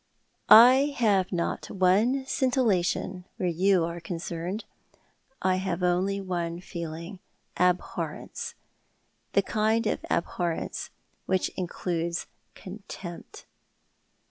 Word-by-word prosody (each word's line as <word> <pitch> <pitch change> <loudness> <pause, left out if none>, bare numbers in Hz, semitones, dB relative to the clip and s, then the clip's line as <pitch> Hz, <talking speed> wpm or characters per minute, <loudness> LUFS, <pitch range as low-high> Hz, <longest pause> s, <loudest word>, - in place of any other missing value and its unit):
"I 260 +5 +8
have 200 -6 +2
not 170 -2 -2
one 210 +9 +2
scintillation, 200 -9 0
where 180 - -1
you 180 +1 +3
are 170 +1 -5
concerned. 170 +3 -4 0.8
I 185 0 +3
have 185 -1 -2
only 185 +3 +1
one 175 -3 -3
feeling— 170 +1 -7 0.4
abhorrence— 180 0 -1 0.8
the - - +4
kind 220 +1 +1
of 215 - -1
abhorrence 170 0 -2 0.4
which 190 -1 +1
includes 170 -1 -3 0.3
contempt."' 190 -2 -9
185 Hz, 90 wpm, -27 LUFS, 175-205 Hz, 0.8 s, I